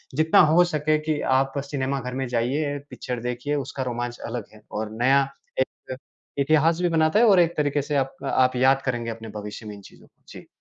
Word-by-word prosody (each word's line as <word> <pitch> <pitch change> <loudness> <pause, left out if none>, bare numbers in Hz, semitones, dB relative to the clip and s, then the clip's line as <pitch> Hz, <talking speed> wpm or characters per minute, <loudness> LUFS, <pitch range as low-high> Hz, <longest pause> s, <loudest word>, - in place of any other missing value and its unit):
जितना 155 +1 +4
हो 175 +2 +6
सके 155 -2 +1
कि 155 -1 -2
आप 135 +1 +1
सिनेमा 140 -1 -2
घर 125 +1 -6
में 135 -1 -2
जाइए, 140 +5 -1
पिक्चर 125 -1 -5
देखिए, 125 +4 -3
उसका 135 -1 -3
रोमांच 120 -1 -4
अलग 115 -2 -4
है 105 - -16
और 105 0 -4
नया 135 +3 +5 0.4
एक 130 - +3 0.3
क 130 - -4 0.4
इतिहास 155 +3 +3
भी 175 - +2
बनाता 160 +4 +3
है 240 - +6
और 195 -3 +6
एक 170 -1 +2
तरीके 145 -1 +1
से 145 +1 -3
आपक 135 0 -3
आप 130 0 +3
याद 135 +2 +3
करेंगे 120 -3 -2
अपने 115 0 -8
भविष्य 105 +2 -8
में 105 - -7
इन 100 - -13
चीज़ों - - -17
को। - - -39
जी। - - -12
135 Hz, 215 wpm, -24 LUFS, 120-150 Hz, 0.4 s, हो